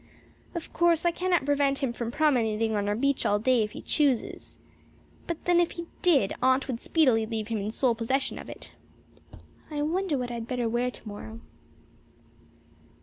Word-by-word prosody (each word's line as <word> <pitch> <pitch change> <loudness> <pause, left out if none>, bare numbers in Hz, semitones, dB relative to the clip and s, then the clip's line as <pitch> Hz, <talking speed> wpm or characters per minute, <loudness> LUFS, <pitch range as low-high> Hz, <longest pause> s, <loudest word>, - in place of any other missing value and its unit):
Of 335 - -6
course, 340 -1 +3
I 345 - +4
cannot 350 -3 0
prevent 280 -1 +1
him 245 -3 0
from 235 -1 -4
promenading 225 -6 +1
on 205 0 0
our 205 - +1
beach 275 +4 +1
all 205 - +2
day 245 +2 +3
if 210 -1 -2
he - - -8
chooses. 280 -6 0 0.7
But 340 -2 -5
then 350 -1 +4
if 345 - +1
he 340 - -6 0.2
did, 285 - +3
Aunt 260 +1 +3
would 245 -3 -4
speedily 255 -9 +3
leave 220 -1 -4
him 225 -2 -1
in 200 +1 -3
sole 240 +2 +1
possession 255 +4 -1
of - - -9
it. - - -10 1.0
I 295 -1 -2
wonder 335 0 0
what 245 -1 -3
I - - -4
had 230 -1 -5
better 245 -2 -1
wear 240 +2 0
tomorrow. 220 -1 -9
255 Hz, 180 wpm, -27 LUFS, 225-300 Hz, 1.0 s, I